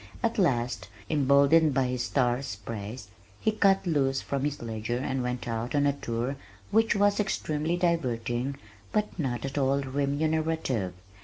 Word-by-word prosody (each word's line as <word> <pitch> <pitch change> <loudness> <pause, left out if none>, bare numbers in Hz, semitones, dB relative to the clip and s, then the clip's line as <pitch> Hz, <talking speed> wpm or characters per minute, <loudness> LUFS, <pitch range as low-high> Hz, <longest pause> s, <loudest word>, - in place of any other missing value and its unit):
At 230 -1 +1
last, 120 - +1 0.2
emboldened 140 +1 +5
by 135 - +3
his 125 -1 -1
star's 125 -4 0
praise, 105 +1 -7 0.3
he 220 - +2
cut 195 -3 +3
loose 135 -5 +1
from 140 0 -2
his 145 -1 -2
ledger 115 +1 -3
and 130 0 -1
went 125 0 -3
out 115 +3 -2
on 145 0 +3
a 140 - +3
tour 125 0 -3 0.3
which 225 +1 +3
was 205 0 +3
extremely 165 -5 0
diverting 130 -7 0 0.4
but 210 -3 -1
not 130 -4 -1
at 135 +1 -2
all 135 +1 +2
remunerative. 140 - 0
135 Hz, 150 wpm, -28 LUFS, 120-160 Hz, 0.4 s, emboldened